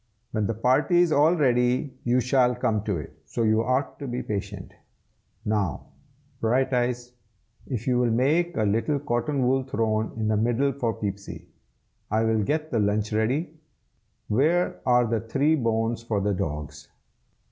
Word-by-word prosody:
When 110 -2 0
the 115 - -2
party 130 - +3
is 170 - 0
all 155 +4 +4
ready, 125 -2 +1
you 125 +1 +3
shall 125 0 +2
come 115 -4 0
to 100 -5 -1
it, 75 - -8
so 115 - -3
you 110 0 +3
ought 130 +3 -1
to 140 - -5
be 125 0 -3
patient. 100 -2 -5 0.7
Now, 105 -9 -1 0.6
Brighteyes, 125 0 0 0.6
if 120 -4 -4
you 125 -1 +2
will 125 -1 +2
make 155 +9 +1
a 110 - +2
little 115 +8 +1
cotton 130 0 -1
wool 135 +2 +2
throne 110 -4 -1
in 110 -1 -1
the 110 -1 +2
middle 120 +5 +1
for 120 -4 -2
Peepsy. 100 -1 -6 0.6
I 110 +1 +1
will 110 -1 +2
get 155 +8 -1
the 115 - +1
lunch 105 +1 0
ready. 130 +9 0 0.7
Where 160 +11 +1
are 125 -1 +4
the 115 -1 -1
three 135 +7 +1
bones 115 -4 0
for 115 -3 -1
the 100 +1 0
dogs?" 75 -4 -5
120 Hz, 160 wpm, -25 LUFS, 110-135 Hz, 0.7 s, all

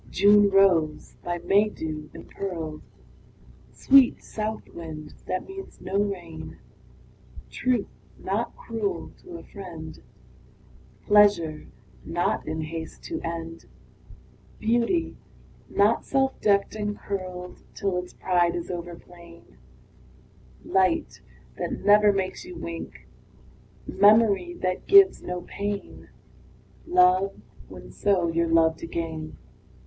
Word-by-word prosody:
June 205 +1 +5
rose, 175 -6 +2
by 175 0 -2
May 205 +5 +3
dew 155 -5 -6
impearled; 165 -6 -6 0.9
Sweet 270 -2 +5
south 215 0 -4
wind, 155 -2 -9
that 185 - -3
means 385 0 -10
no 195 +1 -2
rain; 175 -6 -5 0.9
Truth, 250 -5 0 0.3
not - - -3
cruel 410 -5 -4
to 360 -2 -9
a - - -12
friend; 170 -6 -9 1.0
Pleasure, 200 -7 +4 0.4
not 175 +1 -1
in 160 +1 -3
haste 160 +1 -7
to 330 - -5
end; 165 0 -6 0.9
Beauty, 240 +10 0 0.5
not 210 +3 +2
self 270 -1 0
decked 200 -1 +2
and 210 -1 -3
curled 185 -2 -6
Till 195 -2 -1
its 180 0 -5
pride 175 -2 +1
is 175 0 -4
over 175 -1 -6
plain; 170 - -17 1.1
Light, 185 -3 +1 0.4
that - - -2
never 210 0 +6
makes 190 -2 -3
you 360 0 -10
wink; 170 - -7 0.8
Memory, 205 -4 +4
that 185 0 -2
gives 395 -1 +7
no 180 0 -5
pain; 200 0 -5 0.8
Love, 365 +2 +3 0.3
when, - - -11
so, 190 -4 +1
you're 170 0 +1
loved 165 0 +3
again. 165 -2 -5
185 Hz, 110 wpm, -25 LUFS, 165-210 Hz, 1.1 s, gives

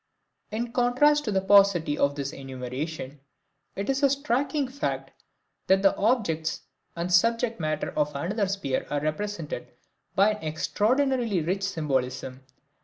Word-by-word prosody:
In 230 +2 -3
contrast 260 +5 +3
to 215 - -1
the 190 -1 +1
paucity 195 -6 +4
of 140 0 +1
this 140 -1 -4
enumeration, 135 +2 -6 0.6
it 195 - -3
is 270 +1 0
a 280 - +5
striking 280 +1 0
fact 280 +3 -3 0.6
that 190 +1 +4
the 195 - +5
objects 195 -9 0 0.3
and 170 +1 -2
subject 230 +4 +3
matter 155 -1 -2
of 150 -1 0
another 195 +8 -1
sphere 190 -9 -2
are 145 - 0
represented 165 +1 -3 0.5
by 200 +3 +5
an 210 0 -6
extraordinarily 225 - +1
rich 185 +5 -1
symbolism. 130 -8 -2
195 Hz, 135 wpm, -26 LUFS, 150-235 Hz, 0.6 s, a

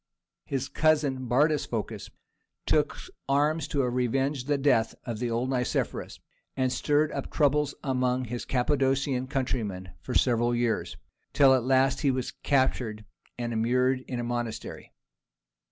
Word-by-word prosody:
His 135 -1 -2
cousin 145 -5 +1
Bardas 145 +5 +2
Phocas 115 -3 -4 0.6
took - - +1 0.3
arms 150 +3 +2
to 140 -3 0
revenge 125 +2 0
the 145 0 +1
death 130 -5 +2
of 115 -4 -4
the 120 0 -1
old 120 +3 -1
Nicephorus, 125 -2 -2 0.4
and 130 -1 +1
stirred 150 +1 +1
up - - -4
troubles 150 -1 +1
among 130 -1 0
his 120 +1 -5
Cappadocian 135 0 0
countrymen 115 -9 -3
for 125 - -5
several 120 -1 +2
years, 120 -1 -1 0.4
till 135 -2 +6
at 130 -2 +1
last 135 +1 +3
he 145 - +3
was 130 -1 -1
captured 125 -6 0 0.3
and 120 -1 -3
immured 125 +3 +2
in 125 - -3
a - - -2
monastery. 120 -2 -4
130 Hz, 135 wpm, -27 LUFS, 120-140 Hz, 0.6 s, till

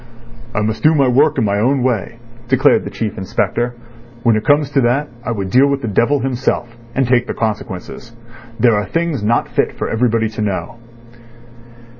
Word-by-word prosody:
"I 105 - +1
must 110 +1 -2
do 155 +1 +4
my 140 -3 +3
work 140 +4 +3
in 120 - +2
my 100 0 0
own 130 +4 +1
way," 120 -2 -1 0.3
declared 130 +1 +3
the - - -4
Chief 110 -4 -4
Inspector. 120 +5 -1 0.5
"When 115 -2 +4
it 110 - -1
comes 145 -1 +2
to 140 - +2
that 130 +5 +1
I - - -4
would 100 -5 -3
deal 135 +5 +5
with 140 -1 -1
the - - -2
devil 120 +7 +2
himself, 125 -2 -2 0.2
and 135 -2 +1
take 125 0 +2
the - - -4
consequences. 110 0 -4 0.5
There 120 -3 +4
are 105 0 0
things 165 -6 -1
not 115 +3 +1
fit - - -1
for - - -3
everybody 115 -1 +1
to 110 - -6
know." 105 +2 -3
120 Hz, 190 wpm, -17 LUFS, 110-135 Hz, 0.5 s, deal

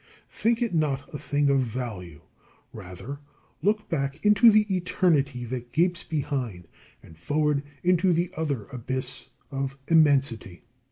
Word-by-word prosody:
Think 235 +1 +1
it 230 - -2
not 150 -4 -1
a 150 - -5
thing 145 -1 +1
of 135 - +3
value. 110 - -5 0.5
Rather 90 +11 -8 0.4
look 210 +5 +1
back 140 +1 -3
into 210 +3 +7
the 215 -1 +5
eternity 150 -8 +1
that 120 0 -6
gapes 175 +1 +1
behind, 130 - -3 0.4
and 80 - -15
forward 150 - +1 0.2
into 180 +1 +3
the 175 +1 0
other 145 -9 -2
abyss 130 +1 -4 0.2
of 135 0 -3
immensity. 140 - +2
140 Hz, 130 wpm, -26 LUFS, 125-170 Hz, 0.5 s, into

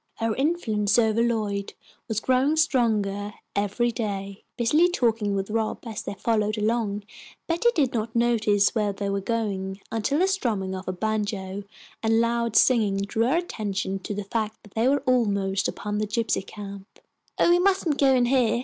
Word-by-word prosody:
Her 225 -1 -1
influence 230 -8 +1
over 225 -1 +3
Lloyd 210 -4 -1 0.3
was 220 -1 -1
growing 260 +6 +2
stronger 210 -8 +1 0.2
every 205 +4 +1
day. 200 -3 -4
Busily 300 +9 +4
talking 225 - +1
with 195 +1 -3
Rob, 220 +1 -2
as 220 -2 -5
they - - -6
followed 215 +1 0
along, 210 -1 0 0.4
Betty 340 +8 +2
did 275 -7 +2
not 225 0 -3
notice 215 -4 +3
where 210 -3 0
they 200 0 -3
were 200 0 -1
going, 195 -3 -2
until 225 +6 0
the 370 +4 +3
strumming 225 - -1
of 185 +1 -6
a - - 0
banjo 205 -1 -3 0.4
and 225 0 +3
loud 235 -1 0
singing 220 -7 +4
drew 200 +4 0
her 285 +6 +2
attention 205 - -3
to 205 - -5
the 205 - -3
fact 220 +1 -3
that 205 - -17
they 225 +2 +1
were 280 +1 +3
almost 200 -6 +1
upon 210 0 -3
the 215 - -1
gypsy 220 -2 -1
camp. 200 -1 -10 0.4
"Oh, - - +4
we 350 - +5
mustn't 370 -5 +1
go 270 -2 +5
in 245 -1 +3
here!" 240 -2 +2
220 Hz, 175 wpm, -25 LUFS, 200-240 Hz, 0.4 s, we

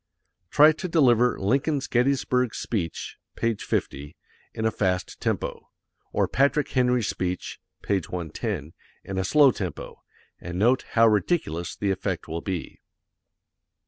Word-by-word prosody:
Try 150 +7 +7
to 170 +4 -5
deliver 125 -8 +3
Lincoln's 135 +7 0
Gettysburg 125 -1 +1
speech 90 -8 -4 0.2
(page 115 -3 -1
50), 70 +2 -3 0.4
in 110 - -4
a 110 - +2
fast 90 -4 -1
tempo, - - -3 0.4
or - - +1
Patrick 140 +2 +1
Henry's 125 -3 +2
speech 90 -1 -3 0.2
(page 100 -3 -1
110), 85 - -4 0.3
in 95 - -5
a - - 0
slow 140 +7 +5
tempo, - - -6 0.4
and 85 0 -6
note 120 +7 +3
how 115 0 +6
ridiculous 105 - 0
the 100 -1 -1
effect 95 -3 -3
will 85 +1 -4
be. 95 -4 -5
110 Hz, 130 wpm, -25 LUFS, 90-130 Hz, 0.4 s, Try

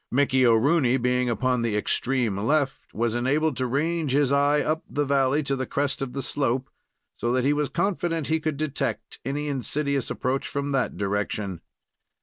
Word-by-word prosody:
Mickey 130 -1 +3
O'Rooney, 130 +3 +4
being 125 0 +1
upon 125 +2 +1
the 115 -3 0
extreme 120 0 0
left, 135 +6 0
was 115 0 -1
enabled 140 +5 +1
to 130 - 0
range 150 +2 0
his 140 -1 +3
eye 145 +1 +3
up 155 +2 -1
the 145 0 0
valley 140 +1 +2
to 140 0 -1
the 130 -1 -3
crest 140 -1 -1
of 130 -2 -3
the 135 0 -3
slope, 130 -1 -1 0.5
so 120 - -1
that 125 0 +1
he 145 - +4
was 145 -2 0
confident 170 -2 -1
he 160 +2 +1
could 155 -2 -2
detect 150 -2 -3
any 145 +3 -2
insidious 140 0 -1
approach 130 +2 -1
from 140 0 -3
that 135 -3 0
direction. 100 -2 -2
135 Hz, 175 wpm, -25 LUFS, 125-145 Hz, 0.5 s, O'Rooney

